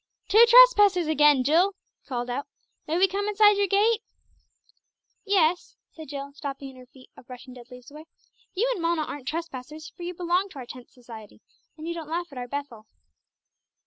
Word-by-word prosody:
"Two 430 +4 +6
trespassers 415 -7 +6
again, 295 -3 +3
Jill!" 345 +8 +2 0.3
he - - -35
called 245 -2 -4
out. 250 +3 -4 0.4
"May 320 +2 -1
we 380 +2 +4
come 400 +2 -3
inside 420 0 +4
your 405 0 +1
gate?" 430 +4 +2 1.2
"Yes," 360 -4 0 0.2
said 315 -1 -12
Jill, 280 0 -7
stopping 280 -1 -7
in - - -18
her 250 0 -15
feat 255 0 -20
of - - -17
brushing 250 0 -12
dead 245 -1 -14
leaves 250 +1 -14
away; 305 +2 -12 0.5
"you 440 +7 +1
and 375 - -7
Mona 335 -1 0
aren't 285 -3 -8
trespassers, 305 -1 -7
for 355 - -14
you 350 +1 -6
belong 360 +3 -1
to - - -13
our 255 - -8
Tenth 250 0 -12
Society, 230 -5 -14 0.4
and 315 +1 -8
you 340 - -3
don't 325 -3 -8
laugh 345 +2 -4
at 265 - -8
our 245 - -6
'Bethel.'" 245 -5 -7
310 Hz, 190 wpm, -25 LUFS, 260-365 Hz, 1.2 s, Two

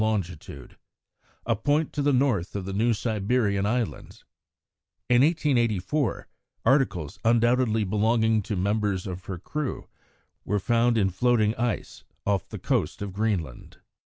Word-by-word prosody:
longitude, 90 - -3 0.7
a 115 - +1
point 145 +8 0
to 145 - -1
the 145 0 +3
north 125 -10 +1
of 100 -2 -3
the 95 - -4
New 115 +4 +2
Siberian 105 -2 0
Islands. 120 0 -3 0.9
In 120 0 +6
1884 135 - +1 0.4
articles 100 - +1
undoubtedly 115 -1 +3
belonging 110 +2 +2
to 105 +2 -4
members 100 0 0
of 90 -1 -6
her 95 - -5
crew 145 - -4 0.6
were 105 - 0
found 115 +3 +2
in 95 -3 +2
floating 110 +1 +2
ice 120 -1 -3 0.2
off 100 -2 0
the - - -6
coast - - -1
of 100 -2 -6
Greenland. 95 - -3
110 Hz, 130 wpm, -26 LUFS, 100-120 Hz, 0.9 s, In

